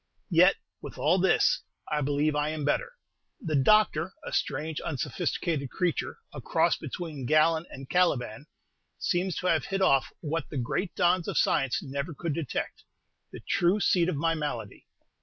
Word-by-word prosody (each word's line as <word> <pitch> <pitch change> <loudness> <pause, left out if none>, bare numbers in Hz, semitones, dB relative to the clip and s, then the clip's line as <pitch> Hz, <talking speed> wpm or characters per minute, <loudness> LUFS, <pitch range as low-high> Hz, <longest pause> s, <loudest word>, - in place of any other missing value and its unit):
Yet, 180 +3 +6 0.3
with - - -9
all 175 +5 +3
this, 185 0 +3 0.3
I 150 -1 +1
believe 145 +2 +1
I 150 +1 +1
am 155 -2 -3
better; - - 0 0.5
the 155 -3 -2
doctor, 180 +2 +3
a - - -6
strange, 155 +2 -2
unsophisticated 155 0 -2
creature, 180 +2 -2 0.2
a - - -7
cross - - +2
between 155 -8 -6
Galen 160 +2 +3
and 135 0 -9
Caliban, 145 -7 0 0.5
seems 180 0 0
to - - -4
have 160 -6 +2
hit 195 0 -1
off 135 -7 +4
what 160 0 -3
the 150 - -5
great 150 - -2
dons 175 0 +2
of - - -2
science 135 -4 +2
never 140 +4 -4
could 165 +1 -3
detect, 150 -5 -4 0.5
the - - -9
true 180 +4 +2
seat 180 -3 +3
of 185 - -1
my 165 +3 +1
malady. 145 -10 -5
160 Hz, 160 wpm, -28 LUFS, 145-175 Hz, 0.5 s, Yet